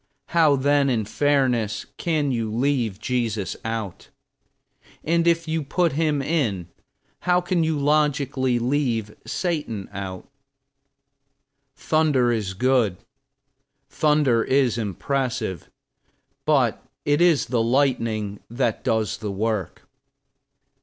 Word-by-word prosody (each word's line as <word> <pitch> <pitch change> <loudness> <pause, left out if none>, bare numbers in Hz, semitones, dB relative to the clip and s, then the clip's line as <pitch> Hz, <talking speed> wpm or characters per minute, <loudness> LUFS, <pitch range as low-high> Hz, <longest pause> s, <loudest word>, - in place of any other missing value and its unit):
How 160 -4 +4
then, 140 +1 +2
in 115 -4 0
fairness, 125 -4 +1
can 155 -5 0
you 115 -3 -2
leave 120 -4 0
Jesus 110 -4 -2
out? 110 -4 -5 0.9
And 170 +1 +1
if 170 -1 +2
you 160 0 -1
put 170 +4 +1
him 150 -1 0
in, 115 - -1 0.5
how 180 0 +2
can 175 -1 0
you 160 -1 0
logically 140 -3 +1
leave 120 -4 -1
Satan 145 - -2
out? 95 -2 -6 1.5
Thunder 145 -5 +2
is 105 -5 -2
good, 120 -4 +2 0.9
thunder 145 -7 +2
is 130 -4 +2
impressive; 115 - -2 0.8
but - - +2 0.2
it 145 +2 +2
is 170 -5 +4
the 120 -1 0
lightning 115 -5 0
that 120 -1 -1
does 110 -1 0
the 105 -2 -4
work. 105 -2 -2
130 Hz, 105 wpm, -23 LUFS, 110-150 Hz, 1.5 s, How